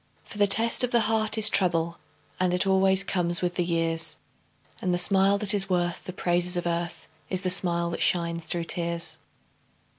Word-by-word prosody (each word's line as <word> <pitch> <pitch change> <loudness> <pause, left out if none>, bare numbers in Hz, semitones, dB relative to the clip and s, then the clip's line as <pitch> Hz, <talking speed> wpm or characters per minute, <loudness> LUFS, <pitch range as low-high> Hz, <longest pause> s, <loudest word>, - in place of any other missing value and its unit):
For 210 - -12
the 205 - +3
test 230 +5 +5
of 250 - 0
the 235 -1 +1
heart 220 0 0
is 220 - +6
trouble, 170 -3 0 0.4
And 180 -1 0
it 180 - +2
always 190 0 +2
comes 175 -1 0
with 175 0 -2
the 175 - -2
years, 165 -1 -1 0.6
And 180 -1 -1
the - - -2
smile 195 +2 +3
that 210 0 +5
is 195 -1 -2
worth 175 -1 -3
the - - -7
praises 175 0 -1
of 175 - -4
earth, 170 -1 -5 0.2
Is 185 0 -2
the 185 - -1
smile 170 -2 -1
that - - -6
shines 170 -1 0
through 170 -1 -1
tears. 170 -1 -4
180 Hz, 190 wpm, -25 LUFS, 170-195 Hz, 0.6 s, is